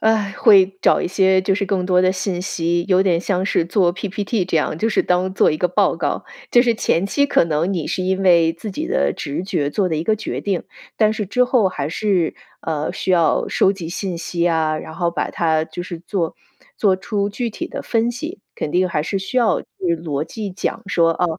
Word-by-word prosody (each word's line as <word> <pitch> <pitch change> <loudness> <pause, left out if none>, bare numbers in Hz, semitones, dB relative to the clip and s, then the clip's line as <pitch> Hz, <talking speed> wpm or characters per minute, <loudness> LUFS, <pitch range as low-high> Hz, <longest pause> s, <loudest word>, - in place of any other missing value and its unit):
啊， 220 -3 +1
会 195 -4 +5
找 - - +4
一 - - -1
些 190 +1 +3
就 190 +1 +1
是 200 - -1
更 185 -2 -1
多 180 -1 +3
的 185 - +4
信 185 -1 -2
息。 170 -2 -1
有 185 -1 +4
点 180 -3 +2
像 190 0 -1
是 170 - +1
做 175 0 +2
PPT， 200 +2 -2
这 175 -2 -1
样 155 - 0
就 220 +8 0
是 220 - +2
当 180 +1 +1
做 190 - +3
一 - - -1
个 180 +3 +1
报 195 +2 +2
告。 160 -4 -2 0.3
就 240 - +6
是 235 -2 +2
前 185 -3 +1
期 285 +8 +2
可 285 - +3
能 165 +3 0
你 170 -5 -2
是 185 - -2
因 190 +1 0
为 170 -3 +5
自 195 +5 -7
己 315 - -4
的 - - +1
直 150 +4 -4
觉 145 -7 -1
做 190 +4 0
的 165 - -1
一 155 - -1
个 215 +5 +1
决 215 - -4
定， 195 -4 -2 0.3
但 215 -1 +3
是 215 -1 -3
之 250 +6 +2
后 245 -5 +2
还 145 -6 -4
是 185 -2 0 0.3
呃， 155 0 -2
需 190 0 -1
要 170 -2 +2
收 195 - +3
集 180 -5 -7
信 180 0 -4
息 170 0 -2
啊， 160 -1 +1
然 160 - -7
后 170 0 0
把 - - -2
它 160 -2 +1
就 175 +2 -7
是 175 -2 -7
做 175 -1 -2 0.4
做 195 -3 +3
出 200 +1 -2
具 235 +4 -3
体 - - -6
的 - - -6
分 230 0 +1
析， 240 -4 -6 0.2
肯 150 - -3
定 185 +1 +2
还 155 - -1
是 195 +3 -2
需 195 +7 -5
要 235 -3 +3
去 - - -26 0.3
逻 155 -3 -3
辑 205 +4 -6
讲 185 - -3
说 170 -3 +3
啊 180 - -1
185 Hz, 255 characters per minute, -20 LUFS, 170-200 Hz, 0.4 s, 就